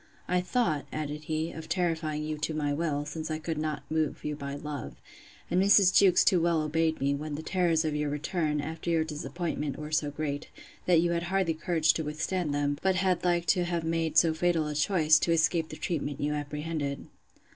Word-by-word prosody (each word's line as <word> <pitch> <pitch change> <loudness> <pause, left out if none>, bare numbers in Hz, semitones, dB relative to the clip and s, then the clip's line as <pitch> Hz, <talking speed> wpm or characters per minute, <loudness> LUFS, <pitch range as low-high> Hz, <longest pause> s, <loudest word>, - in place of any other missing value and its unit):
I 180 0 +2
thought, 180 - 0
added 150 0 -4
he, 160 +1 -2
of 160 - -9
terrifying 160 -4 -1
you 155 0 -4
to 155 +1 -2
my 145 -2 0
will, 145 -2 -1
since 155 +1 -5
I 155 - -1
could 160 0 -4
not 155 -1 -3
move 155 -1 -1
you 150 0 -2
by 140 -1 -5
love; 145 -1 -6 0.6
and 180 - +3
Mrs. 195 -1 +6
Jewkes 190 -3 +6
too 180 -4 +4
well 165 -2 +2
obeyed 160 +1 0
me, 140 +1 +1
when 150 +1 -4
the 155 - -6
terrors 170 -3 +1
of 155 -1 -1
your 150 0 -1
return, 150 0 -1
after 160 +3 -5
your 165 -1 +2
disappointment, 150 -2 -4
were 150 0 -7
so 150 -1 +1
great, 145 0 -4 0.4
that 175 -3 +5
you 170 0 +1
had 170 0 0
hardly 190 -3 +1
courage 160 -2 +2
to 160 - -2
withstand 155 +2 -2
them; 145 0 0
but 190 -1 +2
had 185 -1 +1
like 175 -1 +1
to 180 -3 0
have 170 -1 -2
made 165 -1 -1
so 165 -2 +5
fatal 165 -1 +1
a 150 - -3
choice, 155 0 +4
to 170 - 0
escape 165 0 +2
the - - -7
treatment 145 -4 -3
you 150 +1 0
apprehended. 150 0 -3
155 Hz, 210 wpm, -29 LUFS, 150-170 Hz, 0.6 s, Mrs